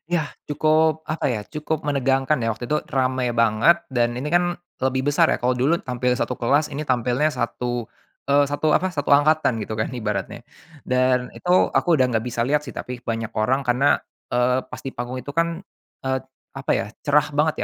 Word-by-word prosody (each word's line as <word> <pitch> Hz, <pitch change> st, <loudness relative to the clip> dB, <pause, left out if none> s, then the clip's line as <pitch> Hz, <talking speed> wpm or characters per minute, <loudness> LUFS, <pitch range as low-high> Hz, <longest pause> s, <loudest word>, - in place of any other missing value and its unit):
Yah, 155 Hz, -4 st, -1 dB, 0.2 s
cukup 155 Hz, +1 st, +2 dB
apa 155 Hz, +1 st, -2 dB
ya, 115 Hz, -4 st, -1 dB
cukup 150 Hz, 0 st, -3 dB
menegangkan 135 Hz, 0 st, +1 dB
ya 115 Hz, -1 st, 0 dB
waktu 120 Hz, +3 st, -7 dB
itu. 150 Hz, -, +2 dB
Rame 130 Hz, -2 st, 0 dB
banget, 115 Hz, -, +4 dB
dan 120 Hz, -2 st, +1 dB
ini 140 Hz, +4 st, -3 dB
kan 175 Hz, +1 st, +2 dB, 0.3 s
lebih 130 Hz, +1 st, +1 dB
besar 160 Hz, +3 st, +3 dB
ya. -, -, -1 dB
Kalau 125 Hz, +1 st, +2 dB
dulu 150 Hz, +7 st, +2 dB
tampil 125 Hz, -1 st, 0 dB
1 125 Hz, 0 st, -2 dB
kelas, 140 Hz, +5 st, +2 dB
ini 150 Hz, +2 st, -5 dB
tampilnya 125 Hz, +3 st, +1 dB
satu, 120 Hz, -1 st, -3 dB, 0.4 s
eee, 145 Hz, +1 st, +5 dB
satu 145 Hz, +2 st, -1 dB
apa, 185 Hz, 0 st, +1 dB
satu 145 Hz, -2 st, -3 dB
angkatan 145 Hz, -3 st, +3 dB
gitu 105 Hz, -, -5 dB
kan 110 Hz, -, -1 dB
ibaratnya. 110 Hz, -1 st, -3 dB, 0.4 s
Dan 125 Hz, 0 st, +1 dB
itu 180 Hz, +1 st, +2 dB
aku 170 Hz, -2 st, +3 dB
udah 130 Hz, -, +4 dB
nggak 110 Hz, -2 st, +1 dB
bisa 120 Hz, -1 st, -1 dB
lihat 145 Hz, +3 st, +2 dB
sih, 150 Hz, -, -9 dB
tapi 125 Hz, -1 st, -6 dB
banyak 115 Hz, -2 st, -3 dB
orang 130 Hz, +5 st, 0 dB
karena, 125 Hz, +3 st, +3 dB, 0.3 s
eee, 125 Hz, +1 st, +2 dB
pas -, -, -8 dB
di 135 Hz, -, -3 dB
panggung 120 Hz, +1 st, -5 dB
itu 145 Hz, -, -7 dB
kan, 170 Hz, +1 st, 0 dB, 0.4 s
eee, 130 Hz, 0 st, 0 dB, 0.4 s
apa -, -, -2 dB
ya, -, -, +1 dB, 0.2 s
cerah 150 Hz, +1 st, +2 dB
banget 150 Hz, +1 st, +1 dB
130 Hz, 190 wpm, -23 LUFS, 125-150 Hz, 0.4 s, eee